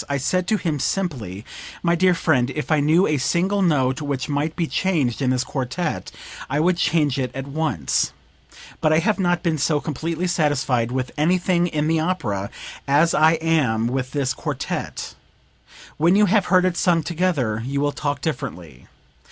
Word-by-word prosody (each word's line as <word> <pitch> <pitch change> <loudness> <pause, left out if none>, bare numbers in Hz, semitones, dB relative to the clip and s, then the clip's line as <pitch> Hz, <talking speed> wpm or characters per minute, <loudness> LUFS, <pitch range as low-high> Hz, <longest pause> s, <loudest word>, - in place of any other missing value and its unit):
I 140 - 0
said 180 +7 0
to 215 - +2
him 160 -6 -2
simply: 125 - -3 0.4
'My 170 -1 +3
dear 180 +1 +3
friend, 135 -7 +1
if 150 +1 -3
I 155 - +4
knew 160 +6 +4
a 150 -2 0
single 190 +8 +1
note 135 -6 +1
which 140 -3 -3
might 150 +2 -1
be 170 - 0
changed 155 -9 0
in 130 - +1
this 130 0 +1
quartet 140 +5 -3 0.4
I 140 +2 0
would 175 +2 +2
change 150 -5 +1
it 130 -1 -1
at 135 0 -4
once; 140 - -1 0.7
but 155 - +3
I 155 - +4
have 200 +6 +1
not 175 -2 +1
been 160 -4 0
so 150 +2 +2
completely 160 +4 -3
satisfied 140 -8 +1
with 130 -1 -2
anything 175 +2 +2
in 155 -2 -1
the 160 0 +2
opera 135 - -2 0.4
as 150 +4 +3
I 155 +1 +5
am 155 -9 +1
with 130 +1 -2
this 140 -3 0
quartet; - - -4 0.8
when 170 +4 +4
you 210 +1 +5
have 205 -1 +2
heard 185 0 +4
it 180 -2 0
sung 170 -3 +2
together 155 -12 -1
you 140 +3 -2
will 145 0 +1
talk 145 0 -3
differently. 90 - -5
155 Hz, 175 wpm, -22 LUFS, 130-175 Hz, 0.8 s, I